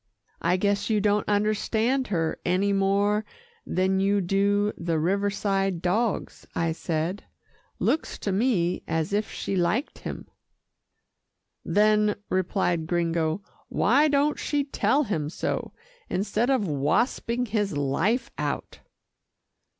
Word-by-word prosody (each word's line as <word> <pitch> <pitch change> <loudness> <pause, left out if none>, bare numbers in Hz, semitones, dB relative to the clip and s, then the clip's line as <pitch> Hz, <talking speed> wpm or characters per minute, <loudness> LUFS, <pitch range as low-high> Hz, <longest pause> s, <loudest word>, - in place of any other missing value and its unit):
"I 175 +2 +2
guess 200 +2 0
you 215 -1 +3
don't 205 +1 +1
understand 220 +5 +1
her 165 -5 -1
any 190 +3 +1
more 200 +2 +2 0.4
than 190 +1 +1
you 200 +1 +2
do 200 +3 +1
the 170 -1 -1
Riverside 195 +1 0
dogs," 200 +6 -1
I 165 -1 +1
said. 165 +3 -2 0.5
"Looks 320 - 0
to 200 - -2
me 190 -4 +1
as 160 +3 -1
if 210 +1 0
she 195 - -3
liked 190 - 0
him." - - -7 1.4
"Then," 210 0 +3 0.2
replied 175 -3 0
Gringo, 170 +1 0 0.3
"why 275 +8 +3
don't 290 0 +2
she 290 -1 0
tell 280 +1 +1
him 160 - -2
so, - - -3 0.4
instead 210 +5 0
of 255 -7 +2
wasping 190 - 0
his 205 -7 -1
life 190 - 0
out?" - - -3
200 Hz, 120 wpm, -26 LUFS, 175-215 Hz, 1.4 s, you